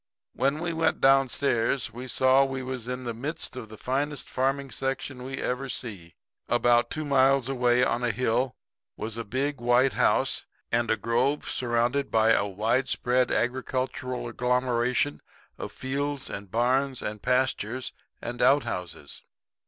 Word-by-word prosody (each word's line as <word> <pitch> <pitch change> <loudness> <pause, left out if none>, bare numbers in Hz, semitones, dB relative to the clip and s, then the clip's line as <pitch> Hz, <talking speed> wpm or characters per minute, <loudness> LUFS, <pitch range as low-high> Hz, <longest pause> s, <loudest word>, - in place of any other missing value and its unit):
"When 140 +2 +1
we 175 -1 -2
went 160 0 +1
down 135 -1 +5
stairs 120 -1 0
we 125 +2 -7
saw 130 +2 +4
we 135 -1 -3
was 130 -2 -4
in 125 0 -4
the 120 -1 -3
midst 140 +3 -4
of 120 -4 -7
the 110 - -10
finest 140 +5 -2
farming 135 +1 -1
section 135 -1 -3
we 135 +1 -5
ever 130 +2 -2
see. 95 -11 -6 0.3
About 120 0 +3
two 155 0 -3
miles 135 -2 +3
away 125 -2 +2
on 120 0 0
a 120 - +2
hill 125 +2 0 0.4
was 110 0 -4
a 115 - -4
big 135 +6 -2
white 120 +2 +3
house - - +2 0.2
in 120 0 +1
a 110 - +2
grove 120 +7 0
surrounded 120 +3 0
by 110 0 +4
a 100 -2 +3
wide 115 +7 0
spread 125 0 +1
agricultural 130 +1 -2
agglomeration 125 +2 0 0.4
of - - -5
fields 140 +1 -3
and 100 0 -7
barns 130 +4 +1
and 105 0 -4
pastures 125 -1 0 0.3
and 120 +1 -4
out 140 +1 +5
houses. 85 -5 -6
125 Hz, 155 wpm, -27 LUFS, 120-135 Hz, 0.4 s, down